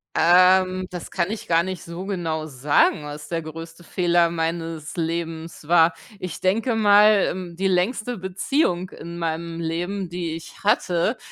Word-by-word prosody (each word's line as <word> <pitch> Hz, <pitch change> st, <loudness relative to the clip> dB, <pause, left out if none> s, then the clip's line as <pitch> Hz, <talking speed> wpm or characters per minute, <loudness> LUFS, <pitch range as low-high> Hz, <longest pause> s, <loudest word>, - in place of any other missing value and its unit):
Ähm, 185 Hz, +1 st, +4 dB
das 180 Hz, -2 st, -7 dB
kann 180 Hz, +2 st, -1 dB
ich 220 Hz, -, -6 dB
gar 165 Hz, 0 st, +3 dB
nicht 185 Hz, -3 st, -5 dB
so 170 Hz, +3 st, -7 dB
genau 165 Hz, -5 st, -2 dB
sagen, 145 Hz, +1 st, +2 dB
was 150 Hz, +1 st, -8 dB
der 165 Hz, -1 st, -2 dB
größte 165 Hz, +2 st, -9 dB
Fehler 175 Hz, -1 st, +2 dB
meines 165 Hz, -1 st, -3 dB
Lebens 165 Hz, -1 st, -4 dB
war. 165 Hz, 0 st, +5 dB, 0.3 s
Ich 180 Hz, -3 st, -6 dB
denke 225 Hz, +6 st, +1 dB
mal, 210 Hz, -1 st, +5 dB
mm, 180 Hz, -2 st, -7 dB
die 195 Hz, +2 st, 0 dB
längste 215 Hz, +6 st, 0 dB
Beziehung 185 Hz, -, 0 dB
in 170 Hz, +1 st, -9 dB
meinem 165 Hz, 0 st, -3 dB
Leben, 175 Hz, +3 st, -3 dB
die 170 Hz, -2 st, -4 dB
ich 165 Hz, -, -11 dB
hatte, 200 Hz, +1 st, +1 dB
175 Hz, 155 wpm, -23 LUFS, 165-185 Hz, 0.3 s, war